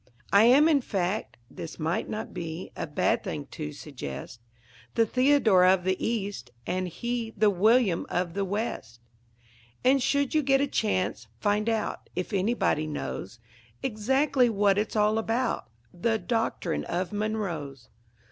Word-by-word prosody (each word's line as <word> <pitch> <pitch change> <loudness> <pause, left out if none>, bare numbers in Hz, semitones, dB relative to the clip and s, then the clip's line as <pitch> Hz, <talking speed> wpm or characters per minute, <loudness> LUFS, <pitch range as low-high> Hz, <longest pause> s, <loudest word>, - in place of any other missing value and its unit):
I 200 +2 +7
am, 275 +6 +7
in 300 -4 +4
fact, 195 -1 -2
(this 165 - -8
might 165 +2 -1
not 215 - -5
be 165 +1 -6
A - - -4
bad 145 - +1
thing 145 - -4
to 150 -1 -5
suggest,) 125 - -8 0.6
The 230 - +4
Theodore 250 -6 +4
of 185 0 +5
the 185 +1 +1
East, 200 - -2 0.2
and 185 +1 -1
he 235 +5 -4
The 210 0 +4
William 205 -1 +3
of 175 -1 -1
the 200 +1 -1
West. 195 - -4 0.8
And, 265 +2 +4
should 280 +1 +1
you 310 - +4
get 270 -1 +3
a 280 - +3
chance, 185 - -1
find 210 +2 +1
out 220 -2 -2
If 180 +4 -3
anybody 195 -6 +1
knows 95 - -5 0.4
Exactly 260 +3 +2
what 205 -2 +3
it's 215 - -2
all 215 +1 +3
about, 230 - -1 0.2
That 220 +5 -1
Doctrine 225 -8 -1
of 180 +3 -2
Monroe's. 175 - -3
205 Hz, 145 wpm, -27 LUFS, 175-230 Hz, 0.8 s, I